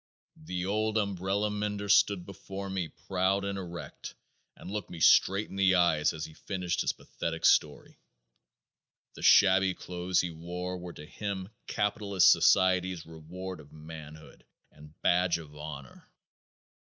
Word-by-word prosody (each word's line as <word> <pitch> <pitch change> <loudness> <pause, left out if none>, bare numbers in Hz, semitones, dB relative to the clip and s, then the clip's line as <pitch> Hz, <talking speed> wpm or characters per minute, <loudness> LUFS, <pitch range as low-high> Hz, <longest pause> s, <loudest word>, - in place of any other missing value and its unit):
The 90 +2 -3
old 110 +2 0
umbrella 100 0 -1
mender 105 0 -3
stood 100 -2 +4
before 95 0 -7
me 95 -3 -2
proud 95 +4 -1
and 100 0 -2
erect 90 -3 -8 0.4
and 95 - -10
looked 105 -3 -4
me 85 - -8
straight 100 +5 +5
in 95 - -7
the 95 -1 +4
eyes 85 -4 +3
as 80 0 -5
he 80 - -12
finished 90 +1 -3
his - - +1
pathetic 80 -1 -5
story. 75 -1 +2 1.1
The - - -12
shabby 95 -1 +5
clothes 90 0 -2
he 90 - -4
wore 90 +3 -5
were 90 -1 -8
to 75 - -10
him 95 +2 -5 0.2
capitalist 105 -2 +3
society's 95 -2 +3
reward 85 +3 -8
of 75 -2 -15
manhood 80 0 -11 0.3
and 75 0 -17
badge 90 -1 +3
of 75 -3 -12
honor. 75 -3 -9
90 Hz, 145 wpm, -29 LUFS, 80-100 Hz, 1.1 s, straight